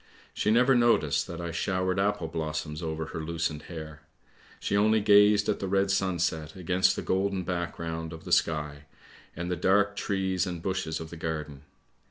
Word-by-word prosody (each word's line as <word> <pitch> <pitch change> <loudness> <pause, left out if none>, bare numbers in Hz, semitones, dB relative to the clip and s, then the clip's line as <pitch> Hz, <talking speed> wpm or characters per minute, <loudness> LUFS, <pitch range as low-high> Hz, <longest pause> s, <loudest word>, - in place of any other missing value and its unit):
She - - 0
never 125 +4 +5
noticed 115 - +3
that 85 -1 -7
I 85 -1 -4
showered 95 +1 -1
apple 100 -3 0
blossom 80 -1 -3
over 80 -1 -3
her - - -3
loosened 80 -1 -2
hair; 80 -2 -8 0.6
she - - -1
only 110 +2 +4
gazed 105 0 +5
at - - 0
the 95 - -3
red 95 +1 +2
sunset 85 -5 -1
against 90 0 +2
the - - -4
golden 95 0 0
background 85 -2 -4
of 80 -1 -9
the - - -8
sky, 75 -2 +1 0.5
and 85 +2 -4
the - - +1
dark 100 +4 +2
trees 95 -3 -1
and 90 -2 -4
bushes 85 -3 -2
of 80 -1 -8
the 85 - -8
garden. 75 -3 -5
85 Hz, 175 wpm, -28 LUFS, 80-95 Hz, 0.6 s, never